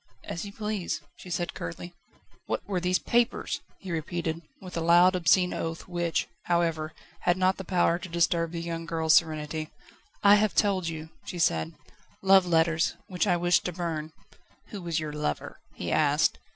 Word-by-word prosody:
"As 170 Hz, -, -5 dB
you 200 Hz, -, -7 dB
please," 210 Hz, -7 st, -3 dB, 0.2 s
she 185 Hz, -, -11 dB
said 175 Hz, 0 st, -2 dB
curtly. 85 Hz, -, -6 dB, 0.5 s
"What -, -, -2 dB
were 195 Hz, -3 st, 0 dB
these 180 Hz, +1 st, +2 dB
papers?" 240 Hz, +2 st, 0 dB, 0.2 s
he 190 Hz, -, -8 dB
repeated, 165 Hz, 0 st, -2 dB, 0.2 s
with 185 Hz, -1 st, -9 dB
a 165 Hz, -, -1 dB
loud 175 Hz, +3 st, +6 dB
obscene 180 Hz, +1 st, +3 dB
oath 165 Hz, 0 st, -4 dB
which, 175 Hz, -2 st, -1 dB, 0.2 s
however, 165 Hz, -2 st, 0 dB, 0.2 s
had 175 Hz, 0 st, +2 dB
not 185 Hz, 0 st, +2 dB
the 190 Hz, -, -5 dB
power 175 Hz, -2 st, +2 dB
to 180 Hz, +1 st, -8 dB
disturb 170 Hz, 0 st, +1 dB
the 170 Hz, -1 st, -4 dB
young 165 Hz, -1 st, -4 dB
girl's 160 Hz, -1 st, +2 dB
serenity. 155 Hz, -1 st, +1 dB, 0.5 s
"I 205 Hz, 0 st, +8 dB
have 215 Hz, 0 st, +1 dB
told 195 Hz, -4 st, +2 dB
you," 160 Hz, -1 st, -5 dB
she 180 Hz, -, -6 dB
said: 80 Hz, -, +1 dB, 0.5 s
"love 190 Hz, -1 st, +6 dB
letters, 165 Hz, -1 st, +2 dB
which 185 Hz, +2 st, -1 dB
I 175 Hz, -2 st, +3 dB
wished 175 Hz, +1 st, +3 dB
to 180 Hz, -, -2 dB
burn." 160 Hz, -3 st, -3 dB, 0.6 s
"Who 205 Hz, -, -7 dB
was 170 Hz, -2 st, -1 dB
your 155 Hz, -1 st, -4 dB
lover?" 150 Hz, -, -3 dB, 0.2 s
he -, -, -4 dB
asked. -, -, +3 dB
170 Hz, 175 wpm, -28 LUFS, 160-185 Hz, 0.6 s, I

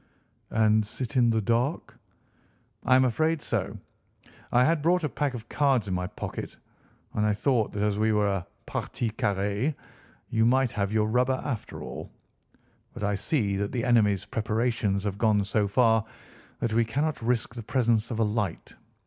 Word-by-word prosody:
"And 110 Hz, -1 st, +3 dB
sit 120 Hz, +5 st, -6 dB
in 120 Hz, -2 st, +4 dB
the 110 Hz, -1 st, +2 dB
dark?" 120 Hz, -, 0 dB, 0.9 s
"I 130 Hz, -, +4 dB
am 130 Hz, 0 st, +5 dB
afraid 155 Hz, +6 st, +1 dB
so. -, -, -3 dB, 0.7 s
I 125 Hz, -, +5 dB
had 155 Hz, +3 st, +2 dB
brought 175 Hz, +3 st, +2 dB
a 150 Hz, -, 0 dB
pack 140 Hz, -2 st, -2 dB
of 115 Hz, -1 st, -8 dB
cards 135 Hz, -7 st, +1 dB
in 95 Hz, -, -2 dB
my 90 Hz, 0 st, -1 dB
pocket, -, -, -6 dB, 0.6 s
and 105 Hz, -, 0 dB
I 105 Hz, 0 st, +3 dB
thought 115 Hz, +1 st, +1 dB
that, 100 Hz, -, -1 dB
as 105 Hz, -1 st, 0 dB
we 110 Hz, 0 st, +3 dB
were 105 Hz, -1 st, +2 dB
a 95 Hz, -3 st, -2 dB, 0.2 s
partie 115 Hz, -2 st, -3 dB
carrée, 105 Hz, +6 st, -1 dB, 0.5 s
you 110 Hz, 0 st, +1 dB
might 130 Hz, +1 st, +3 dB
have 100 Hz, -2 st, -1 dB
your 110 Hz, -1 st, +2 dB
rubber 125 Hz, +3 st, +1 dB
after 120 Hz, -7 st, -4 dB
all. -, -, -7 dB, 0.9 s
But -, -, -6 dB
I 105 Hz, 0 st, +1 dB
see 105 Hz, -, 0 dB
that 100 Hz, 0 st, -2 dB
the 120 Hz, -, -2 dB
enemy's 105 Hz, -5 st, +3 dB
preparations 110 Hz, -2 st, 0 dB
have 100 Hz, -1 st, -3 dB
gone 105 Hz, -3 st, +3 dB
so 105 Hz, +1 st, +1 dB
far 115 Hz, 0 st, +3 dB, 0.6 s
that 115 Hz, -2 st, 0 dB
we 115 Hz, +1 st, +4 dB
cannot 145 Hz, +6 st, -1 dB
risk 115 Hz, -1 st, 0 dB
the 120 Hz, -, -6 dB
presence 115 Hz, -2 st, +1 dB
of 115 Hz, -, -3 dB
a 115 Hz, -, +2 dB
light. 105 Hz, -4 st, -2 dB
115 Hz, 175 wpm, -27 LUFS, 105-125 Hz, 0.9 s, am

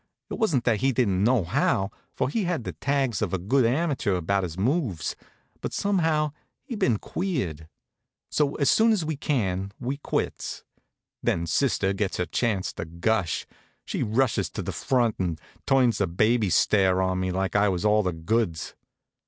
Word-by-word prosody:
It -, -, -4 dB
wa'n't 160 Hz, -, +2 dB
that 115 Hz, -3 st, +1 dB
he 135 Hz, +1 st, +3 dB
didn't 100 Hz, -7 st, +1 dB
know 120 Hz, -2 st, +3 dB
how, 95 Hz, +4 st, +1 dB, 0.2 s
for -, -, 0 dB
he 195 Hz, +9 st, -1 dB
had 175 Hz, -5 st, -1 dB
all -, -, -11 dB
the -, -, -4 dB
tags 135 Hz, -6 st, 0 dB
of 95 Hz, -3 st, 0 dB
a -, -, 0 dB
good 115 Hz, +7 st, +2 dB
amateur 135 Hz, -, 0 dB
about 95 Hz, +3 st, 0 dB
his 85 Hz, -2 st, -5 dB
moves; 115 Hz, -, 0 dB, 0.5 s
but -, -, -4 dB
somehow 160 Hz, -7 st, +1 dB, 0.3 s
he'd 240 Hz, -6 st, -6 dB
been 120 Hz, -3 st, +3 dB
queered. 100 Hz, -, -3 dB, 0.6 s
So, 145 Hz, -2 st, +1 dB
as 140 Hz, -, +1 dB
soon 225 Hz, 0 st, +5 dB
as 185 Hz, -7 st, 0 dB
we 155 Hz, 0 st, -2 dB
can, 100 Hz, -10 st, -1 dB
we 130 Hz, +3 st, -3 dB
quits. 145 Hz, -, -3 dB, 0.6 s
Then 85 Hz, 0 st, 0 dB
sister 95 Hz, -, +1 dB
gets 100 Hz, -1 st, -2 dB
her 90 Hz, -, 0 dB
chance 100 Hz, +3 st, -1 dB
to -, -, -5 dB
gush. 85 Hz, +2 st, -1 dB, 0.4 s
She -, -, -3 dB
rushes 110 Hz, -, +1 dB
to -, -, -4 dB
the -, -, -3 dB
front 120 Hz, -4 st, 0 dB
and 85 Hz, -4 st, -1 dB, 0.3 s
turns 130 Hz, -4 st, +3 dB
the 100 Hz, -, +2 dB
baby 110 Hz, +5 st, +2 dB
stare 95 Hz, +2 st, +3 dB
on 95 Hz, 0 st, +1 dB
me 95 Hz, 0 st, -1 dB
like 95 Hz, +2 st, -2 dB
I 100 Hz, 0 st, +4 dB
was 90 Hz, +1 st, -2 dB
all 105 Hz, 0 st, +4 dB
the 90 Hz, -3 st, -1 dB
goods. 85 Hz, 0 st, -1 dB
110 Hz, 180 wpm, -26 LUFS, 95-135 Hz, 0.6 s, soon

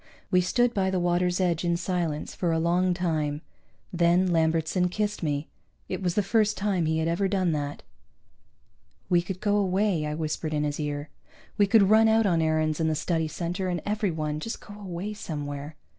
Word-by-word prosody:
We 180 Hz, -1 st, +5 dB
stood 240 Hz, +7 st, +2 dB
by 190 Hz, -1 st, +1 dB
the 190 Hz, -1 st, 0 dB
water's 175 Hz, +1 st, +1 dB
edge 175 Hz, -3 st, +1 dB
in 170 Hz, -1 st, +1 dB
silence 175 Hz, -4 st, -2 dB
for 175 Hz, -2 st, -1 dB
a 165 Hz, -, +1 dB
long 175 Hz, +2 st, +2 dB
time. 155 Hz, -4 st, -1 dB, 0.5 s
Then 175 Hz, +1 st, +3 dB
Lambertson 165 Hz, +2 st, +1 dB
kissed 210 Hz, +2 st, -2 dB
me. 150 Hz, -2 st, -1 dB, 0.4 s
It -, -, -4 dB
was 180 Hz, -2 st, -1 dB
the 210 Hz, -, +2 dB
first 215 Hz, +1 st, +2 dB
time 195 Hz, -5 st, 0 dB
he 160 Hz, 0 st, +1 dB
had 160 Hz, 0 st, 0 dB
ever 170 Hz, +4 st, +1 dB
done 190 Hz, -3 st, +1 dB
that. 145 Hz, -2 st, -3 dB, 1.3 s
"We 175 Hz, -1 st, +5 dB
could 180 Hz, +1 st, -6 dB
go 205 Hz, +1 st, +1 dB
away," 190 Hz, -4 st, +1 dB
I 150 Hz, -, -3 dB
whispered 155 Hz, 0 st, -2 dB
in 150 Hz, -, 0 dB
his 145 Hz, 0 st, -2 dB
ear. 145 Hz, 0 st, -3 dB, 0.5 s
"We 205 Hz, -2 st, +3 dB
could 215 Hz, +1 st, +6 dB
run 220 Hz, +1 st, +6 dB
out 220 Hz, 0 st, +4 dB
on 170 Hz, -4 st, +2 dB
Aarons 155 Hz, -1 st, +1 dB
and 160 Hz, -1 st, +1 dB
the 155 Hz, -, 0 dB
Study 160 Hz, 0 st, 0 dB
Center 175 Hz, +4 st, -3 dB
and 175 Hz, -1 st, -1 dB
everyone, 160 Hz, -8 st, -1 dB
just 225 Hz, +8 st, -5 dB
go 205 Hz, -, -12 dB
away 200 Hz, 0 st, -5 dB
somewhere." 145 Hz, -5 st, -6 dB
175 Hz, 190 wpm, -27 LUFS, 160-190 Hz, 1.3 s, could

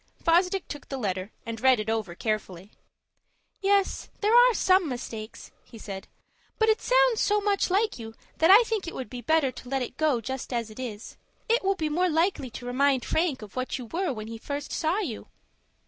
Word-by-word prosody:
Fosdick 360 Hz, +3 st, +2 dB
took 290 Hz, -, -8 dB
the 270 Hz, -, -3 dB
letter, 190 Hz, -3 st, -3 dB
and 230 Hz, -1 st, -6 dB
read 260 Hz, -2 st, +5 dB
it 215 Hz, -, -4 dB
over 220 Hz, -6 st, -2 dB
carefully. 200 Hz, -2 st, -3 dB, 0.9 s
"Yes, 395 Hz, 0 st, +1 dB
there 430 Hz, +3 st, +3 dB
are 485 Hz, -1 st, +7 dB
some 370 Hz, -4 st, +3 dB
mistakes," 225 Hz, -3 st, -7 dB
he 230 Hz, -, -14 dB
said; 195 Hz, -3 st, -8 dB, 0.5 s
"but 440 Hz, 0 st, +3 dB
it 435 Hz, -, +2 dB
sounds -, -, +3 dB
so 420 Hz, 0 st, +3 dB
much 405 Hz, -1 st, +1 dB
like 405 Hz, -, +1 dB
you 225 Hz, -1 st, -8 dB, 0.2 s
that 325 Hz, -, +4 dB
I 415 Hz, +5 st, +9 dB
think 445 Hz, -5 st, -3 dB
it -, -, -6 dB
would 260 Hz, -, -6 dB
be 250 Hz, -1 st, -6 dB
better 300 Hz, +1 st, +2 dB
to 250 Hz, -, -11 dB
let 270 Hz, -1 st, 0 dB
it -, -, -8 dB
go 305 Hz, -6 st, +2 dB
just 260 Hz, +4 st, -5 dB
as 230 Hz, -3 st, -2 dB
it 215 Hz, -, -12 dB
is. 225 Hz, -4 st, -7 dB, 0.3 s
It 465 Hz, 0 st, +2 dB
will 390 Hz, +1 st, +2 dB
be 315 Hz, -4 st, -2 dB
more 355 Hz, +4 st, +1 dB
likely 325 Hz, -4 st, +1 dB
to 245 Hz, -, -9 dB
remind 260 Hz, +1 st, +1 dB
Frank 315 Hz, -8 st, 0 dB
of 205 Hz, -, -12 dB
what 255 Hz, +2 st, -2 dB
you 250 Hz, -, -7 dB
were 345 Hz, -, -2 dB
when 215 Hz, -4 st, -6 dB
he 225 Hz, 0 st, -7 dB
first 285 Hz, +4 st, -5 dB
saw 325 Hz, +4 st, 0 dB
you." 320 Hz, -, -4 dB
275 Hz, 210 wpm, -27 LUFS, 230-380 Hz, 0.9 s, I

